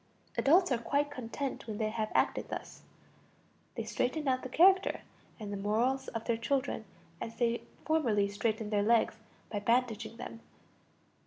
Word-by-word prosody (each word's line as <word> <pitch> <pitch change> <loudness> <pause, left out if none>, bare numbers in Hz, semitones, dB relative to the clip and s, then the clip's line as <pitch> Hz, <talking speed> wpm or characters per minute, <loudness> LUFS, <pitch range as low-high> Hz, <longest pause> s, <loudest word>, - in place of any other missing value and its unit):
Adults 345 +4 +4
are 245 - +2
quite 285 +4 0
content 260 0 -4
when 215 -2 -4
they 215 0 0
have 220 -1 -2
acted - - +1
thus. - - -6 0.9
They - - -2
straighten 300 +4 -1
out 255 -1 +2
the 255 - -6
character 375 +7 +5 0.4
and 205 -2 -5
the - - -2
morals 240 +7 +1
of 225 -2 -5
their 235 -2 +1
children 260 -1 -1 0.4
as 225 - -5
they 235 -1 +1 0.2
formerly 235 -11 +2
straightened 215 +1 -1
their 205 -1 +3
legs 225 +1 +3 0.3
by 210 - -1
bandaging 230 0 0
them. 230 -1 -7
235 Hz, 155 wpm, -32 LUFS, 220-270 Hz, 0.9 s, character